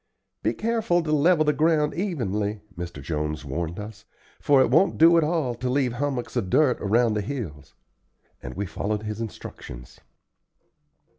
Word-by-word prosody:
"Be - - 0
careful 220 -6 +1
to 155 - -2
level 155 +2 +4
the 150 - +3
ground 155 -1 +2
evenly," 110 - -2
Mr. 85 -5 -7
Jones 75 0 -3
warned 85 +5 -4
us, 105 +1 -9 0.4
"for 140 -2 +4
it 130 - +3
won't 165 +8 +4
do 165 +2 +7
at 165 - +4
all 150 -5 0
to 125 +2 -3
leave 130 -2 +1
hummocks 130 -1 -3
of 110 -7 -1
dirt 135 +3 +3
around 115 +3 +2
the 105 - 0
hills;" 95 - -6 0.7
and 60 - -8
we 100 +3 -2
followed 105 +2 -3
his 105 +1 -4
instructions. 60 - -9
120 Hz, 160 wpm, -25 LUFS, 100-155 Hz, 0.7 s, do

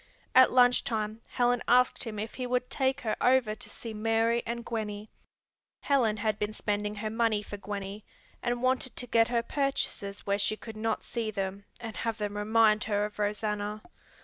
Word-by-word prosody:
At 260 0 +7
lunch 250 -1 +5
time 215 -1 -2
Helen 245 0 +1
asked 250 +1 +4
him 220 -2 -5
if 215 +2 -4
he 255 -1 -4
would 250 0 -1
take 265 0 +1
her 220 -3 -1
over 250 -4 +4
to 215 - -8
see 230 -2 -7
Mary 225 +2 +2
and 235 0 -3
Gwenny. 210 -2 -4 0.7
Helen 240 -7 +2
had 215 0 -1
been 210 +1 -1
spending 210 0 -2
her 215 +1 -3
money 225 -2 +1
for 205 - -7
Gwenny, 200 0 -6 0.4
and 240 0 -1
wanted 255 0 +1
to 245 - -2
get 225 -1 +4
her 235 -1 +1
purchases 250 -7 -2
where 200 0 +1
she 215 +1 +1
could 225 0 -9
not 220 0 -1
see 230 -2 -3
them 200 -1 -4
and 225 -2 -7
have 230 -1 -2
them 205 -1 -3
remind 215 0 +3
her 205 -1 +1
of 210 0 -8
Rosanna. 210 0 -2
220 Hz, 185 wpm, -29 LUFS, 210-240 Hz, 0.7 s, At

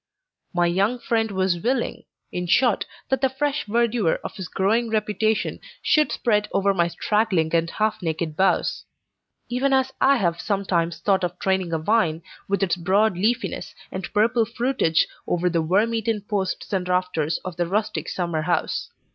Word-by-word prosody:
My 175 -2 +2
young 195 +8 +1
friend 225 -2 0
was 190 -3 0
willing, 245 +6 -1 0.3
in 180 0 -3
short, 240 +4 +3 0.2
that 265 -1 +1
the 265 - +3
fresh 290 +2 -1
verdure 230 -4 +1
of - - -6
his 190 -3 -6
growing 220 +7 +1
reputation 215 0 0 0.2
should 305 -1 +3
spread 210 -3 +1
over 195 0 +2
my 170 -2 +2
straggling 185 -4 0
and 165 0 +2
half 215 +4 -1
naked 160 -2 -2
boughs; 190 +3 +1 0.6
even 260 +3 +1
as 265 0 +2
I 275 +1 +6
have 170 -6 0
sometimes 185 -5 0
thought 195 -2 +1
of 175 - -2
training 190 -2 0
a 165 - +1
vine, 165 -2 +1 0.2
with 200 0 0
its 180 -2 +1
broad 195 +4 +2
leafiness, 230 +6 -1 0.2
and 190 -1 -5
purple 230 +3 +3
fruitage, 235 -7 +1 0.2
over 175 0 +1
the 165 -1 +1
worm 200 +8 +2
eaten 225 -1 -1
posts 200 -1 -3
and 180 -2 -1
rafters 180 -4 0
of 180 -2 -6
the 175 -1 0
rustic 215 +3 -1
summer 170 -3 -2
house. 175 +3 -1
195 Hz, 165 wpm, -23 LUFS, 175-225 Hz, 0.6 s, I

